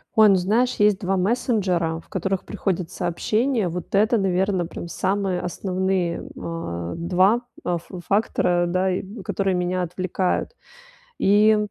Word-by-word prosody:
Ой, 215 -1 +7
ну 195 - +6
знаешь, 225 +8 +2
есть 210 -2 +3
2 190 0 0
мессенджера, 185 -6 0
в - - -18
которых 190 0 -2
приходят 180 -3 -2
сообщения, 215 +5 0
вот 175 +3 -4
это, 220 +3 +3
наверно, 190 -2 +1
прям 170 - -7
самые 190 0 -1
основные, 185 -1 -1 0.2
а, 85 - -4
2 185 +7 +3 0.2
э, 180 - 0
ф 170 - -8 0.2
фактора, 180 -4 +2
да, 185 +2 +1
и 185 - -1 0.2
которые 195 -2 0
меня 180 +1 0
отвлекают. 185 - -2 0.6
И, 210 +2 +5
185 Hz, 140 wpm, -23 LUFS, 175-205 Hz, 0.6 s, Ой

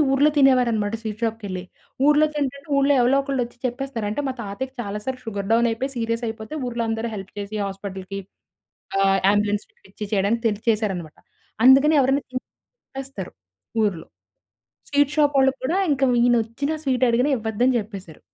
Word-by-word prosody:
ఊర్లో 285 +3 +4
తినేవారన్నమాట 245 -6 +3
స్వీట్ 215 +1 -6
షాప్‌కె‌ళ్లి. 205 -5 -3 0.4
ఊర్లో 300 +1 +5
తింటంటే 280 0 -3
ఊర్లో 275 +1 +4
ఎవలో 245 +3 +4
ఒకళ్ళు 275 -2 -1
వచ్చి 240 +1 -14
చెప్పేస్తారు. 245 -3 -4
అంటే 255 - -2
మా - - -1
తాతయ్యకి 255 +7 -5
చాలా 205 -1 -4
సార్లు 255 0 -4
షుగర్ 200 -3 -4
డౌన్ 235 +1 +4
అయిపోయి 260 +5 -2
సీరియస్ 230 +1 -1
అయిపోతే, 220 +4 -7
ఊర్లో 240 -1 -2
అందరూ 225 +1 -2
హెల్ప్ 195 -2 -8
చేసి 205 +1 -5
హాస్పిటల్‌కి, 195 0 -6 0.8
ఆహ్, 195 0 +3
అంబులెన్స్‌ని 205 0 0
పిలిపిచ్చి 200 +2 -8
చేయడానికి 210 +3 +1
తెలిసి 210 0 -4
చేసారన్నమాట. 195 -8 -2 0.5
అందుకని 275 +4 +7
ఎవరైనా 270 +2 +2
తింటే 255 0 -5 0.4
చెప్పేస్తారు 270 -8 -7 0.5
ఊర్లో. 180 -6 -2 0.8
స్వీట్ 285 0 +2
షాప్ 290 -1 +3
వాళ్ళక్కూడా 265 +5 +1
ఇంకా 275 -1 +2 0.2
ఈయనొచ్చినా, 240 +5 +1
స్వీట్ 255 -1 +2
అడిగినా, 245 +5 +2
ఇవ్వద్దని 230 +3 +1
చెప్పేశారు. 195 -7 -9
235 Hz, 150 wpm, -23 LUFS, 205-270 Hz, 0.8 s, అందుకని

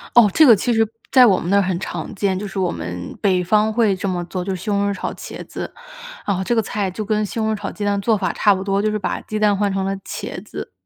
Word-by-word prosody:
哦， 235 -4 +8
这 315 - +6
个 245 - +9
其 240 +4 0
实 225 0 +3 0.2
在 255 -2 +7
我 195 -6 +4
们 175 - -4
那 200 - +4
儿 200 - +5
很 185 -2 -1
常 - - -5
见， 195 -2 0
就 205 - -4
是 195 - -5
我 185 -2 +1
们 90 - -6
北 185 -3 +3
方 215 +4 +2
会 215 -3 +2
这 190 +1 -3
么 175 -1 -2
做， 180 +1 -4
就 195 - -2
是 180 - -8
西 210 - -5
红 200 0 +1
柿 200 - 0
炒 190 - -4
茄 - - -8
子。 - - -7 0.5
然 200 - +1
后 190 - -2
这 240 - 0
个 225 - +3
菜 200 -2 -2
就 215 +3 -5
跟 215 0 0
西 215 - -5
红 220 0 +1
柿 - - -1
炒 - - -5
鸡 205 - -5
蛋 200 0 +1
做 220 +1 +2
法 190 - -1
差 205 - +4
不 190 0 -3
多， 195 0 0
就 215 0 +1
是 215 - -1
把 - - -3
鸡 215 - -4
蛋 210 -1 +3
换 205 0 +1
成 190 0 -1
了 195 - -1
茄 - - -6
子。 - - -8
200 Hz, 325 characters per minute, -20 LUFS, 190-215 Hz, 0.5 s, 个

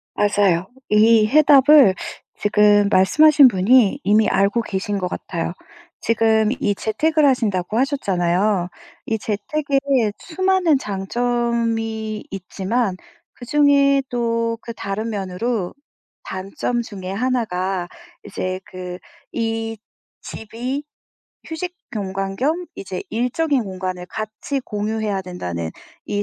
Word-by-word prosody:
맞아요. 200 -4 +2 0.2
이 215 +1 +5
해답을 285 -4 +6 0.4
지금 210 -1 +4
말씀하신 285 +10 +6
분이 215 +1 +3
이미 210 +2 +3
알고 200 +4 +2
계신 205 -1 -3
것 185 - -2
같아요. 170 -1 -4 0.5
지금 220 -1 +2
이 205 - 0
재택을 305 +10 +1
하신다고 215 -7 +1
하셨잖아요. 195 - +1 0.4
이 225 - 0
재택의 270 +2 0
수많은 375 -3 +1
장점이 225 0 -2
있지만 195 +3 -2 0.4
그중에 280 +1 +3
또 230 -1 -1
그 230 - -7
다른 215 +2 -4
면으로 200 0 -3 0.5
단점 195 +6 -3
중에 190 -4 -7
1가 195 -6 -1 0.4
이제 185 0 -4
그 180 -1 -8 0.3
이 225 -1 -2 0.4
집이 245 +6 -5 0.6
휴식 355 +3 -5 0.2
공간 195 -1 -3
겸 325 +7 -1
이제 185 -2 -5
일적인 250 +3 0
공간을 185 -1 -5
같이 215 +8 -4
공유해야 210 -1 -2
된다는 90 - -5 0.3
이 205 0 -2
220 Hz, 220 characters per minute, -20 LUFS, 195-250 Hz, 0.6 s, 해답을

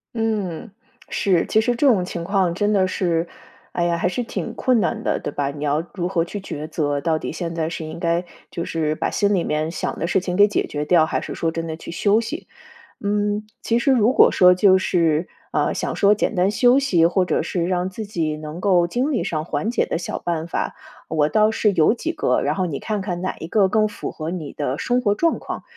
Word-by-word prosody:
嗯， 215 -3 -2 0.4
是， 185 -4 +1
其 220 - +2
实 240 +2 0
这 280 +4 +2
种 205 -8 +4
情 175 -2 -5
况 185 -3 +1
真 210 +2 +1
的 190 -2 +3
是， 170 -2 0 0.5
哎 175 - 0
呀， 170 0 +1
还 170 - 0
是 245 +7 -2
挺 - - -5
困 255 -3 +2
难 225 +1 -1
的， - - 0
对 - - -4
吧？ 140 0 -2
你 145 0 -7
要 150 +2 +1
如 180 -3 -2
何 170 -3 +1
去 205 +4 -6
抉 155 -5 -6
择？ 145 -3 -1
到 160 +1 0
底 - - -4
现 165 +1 -4
在 160 -1 -1
是 165 -1 -5
应 155 +1 -7
该 170 +1 0 0.2
就 170 - -4
是 155 -2 -1
把 - - -2
心 205 0 +2
里 175 - +1
面 155 +1 -1
想 170 - -4
的 170 - -1
事 190 - +2
情 180 -1 -3
给 205 +2 +6
解 210 - 0
决 150 0 -4
掉， 160 0 +4
还 - - -2
是 - - -6
说 165 -1 -1
真 165 0 -4
的 160 0 -5
去 - - -9
休 205 +5 +2
息。 290 +9 -5 0.5
嗯， 205 +1 0 0.2
其 230 - +1
实 255 +3 +2
如 245 -2 +4
果 - - +6
说 180 -1 +6
就 190 0 +5
是， 165 -3 +1 0.2
呃， - - 0
想 - - -2
说 205 +1 +4
简 210 - -1
单 185 +1 +2
休 245 +5 +4
息， 175 -12 +3
或 185 +2 +3
者 - - 0
是 170 -2 -2
让 180 0 0
自 220 +4 -6
己 165 -7 -2
能 155 +2 -7
够 180 -3 +3
精 255 - -1
力 245 - 0
上 155 -1 -2
缓 155 +7 -2
解 240 - +1
的 165 - -2
小 - - -4
办 165 -1 -3
法， - - -3 0.3
我 155 -1 +1
倒 215 0 +3
是 215 -2 +2
有 160 +5 +4
几 320 +7 -3
个， - - 0
然 - - 0
后 185 -1 0
你 150 -5 -3
看 210 -2 -2
看 180 -2 -4
哪 185 - -2
一 - - -7
个 195 +1 +3
更 215 +1 +3
符 210 - -6
合 155 +1 -5
你 165 -5 -5
的 145 -1 -3
生 250 0 +1
活 205 -4 +2
状 330 +10 +1
况， - - -6
180 Hz, 260 characters per minute, -22 LUFS, 165-210 Hz, 0.5 s, 给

